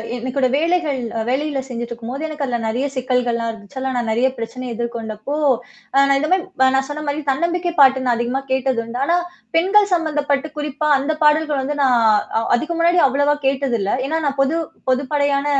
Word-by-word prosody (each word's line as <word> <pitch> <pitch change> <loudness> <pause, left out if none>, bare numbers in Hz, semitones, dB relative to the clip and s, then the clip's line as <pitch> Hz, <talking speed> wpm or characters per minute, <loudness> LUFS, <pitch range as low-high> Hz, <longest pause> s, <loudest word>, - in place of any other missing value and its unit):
என்னோட 255 +2 0
வேலைகள் 320 -2 +1 0.3
வேலையில 280 +2 -1
செஞ்சுட்டு 240 -1 -5
இருக்கும்போது 240 +6 -5
எனக்கு 305 -2 -5
அதுல 245 -2 -2
நெறைய 245 +5 -1
சிக்கல்கள்லாம் 245 -2 0
இருந்துச்சு. 215 +2 -13
அதெல்லாம் 260 -1 -2
நான் 235 -2 -1
நெறைய 240 +4 +2
பிரச்சனை 230 +2 -6
எதிர்கொண்டப்போ, 235 +3 -4 0.6
அ 275 0 +6
நான் 275 0 +3
இந்த 305 +2 -1
மாரி 355 -8 +1
நான் 270 0 +1
சொன்ன 300 +1 -5
மாரி 295 +2 -3
தன்னம்பிக்கை 345 +4 -1
பாட்டு 265 -1 +5
நான் 240 - +3
அதிகமா 245 +3 -1
கேட்டதுண்டு. 245 -3 -1
ஆனா 340 +4 +2 0.4
பெண்கள் 395 +4 +3
சம்மந்தப்பட்டு 295 -3 -1
குறிப்பா 300 +1 -2
அந்த 295 +3 -1
பாடல்கள் 300 -2 +3
வந்து 290 +2 -3
நான் 250 -3 +4 0.4
அ - - -1
அதுக்கு 320 +7 -3
முன்னாடி 345 +1 +4
அவ்வளவா 285 +2 +2
கேட்டதில்ல. 255 -7 0 0.2
ஏன்னா 320 +3 0
நான் 275 0 -2
பொது 275 +4 +1 0.3
பொதுப்படையான 280 +1 0
275 Hz, 170 wpm, -20 LUFS, 245-300 Hz, 0.6 s, அ